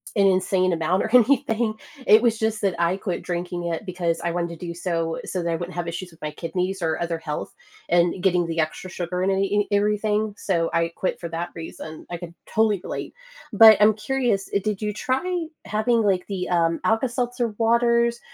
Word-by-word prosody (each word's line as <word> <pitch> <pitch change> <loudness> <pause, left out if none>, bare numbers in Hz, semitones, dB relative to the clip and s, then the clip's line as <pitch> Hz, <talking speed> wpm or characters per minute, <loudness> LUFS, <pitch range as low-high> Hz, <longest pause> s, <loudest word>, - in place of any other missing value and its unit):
an 200 - +4
insane 185 -1 +2
amount 170 +3 +1
or 220 - -2
anything, 235 -3 +3 0.3
it 215 - +8
was 230 -2 +2
just 220 -1 -1
that 195 -3 +1
I 170 +2 +2
quit 190 -3 -3
drinking 175 0 -4
it 170 +5 -3
because 175 -3 -1
I 170 - -1
wanted 170 0 -2
to 180 - -6
do 170 - -4
so, 165 -2 -2
so 180 -2 -3
that 170 - -1
I - - +1
wouldn't 175 +2 -6
have 175 -1 -3
issues 175 +2 -5
with 165 - -20
my 150 0 -4
kidneys 180 +4 -3
or 160 -1 0
other 170 -1 -2
health 150 -2 -5 0.4
and 175 +1 +2
getting 180 -3 +2
the 165 0 -3
extra 160 +4 -2
sugar 180 0 -3
in 190 - +1
any 195 0 +2
in 205 0 +2
everything, 210 +1 +1
so 170 -6 -1
I 170 0 +2
quit 185 - -2
for 170 - -5
that 170 +2 -4
reason, 160 -1 -9
I 175 - -4
can 170 -1 -9 0.2
totally 215 -4 +2
relate. - - -5 0.4
But 220 0 +9
I'm 210 +1 +6
curious, 215 -2 -1
uh, 200 - +4
did 210 -1 -2
you 210 0 -1
try 330 - -1 0.2
having, 225 +2 +1
like, 195 -4 +1
the, 190 -3 -4
um, 165 -2 +2
Alka 225 +4 +2
Seltzer 245 -1 -1
waters 235 +1 +3
185 Hz, 210 wpm, -24 LUFS, 170-215 Hz, 0.4 s, But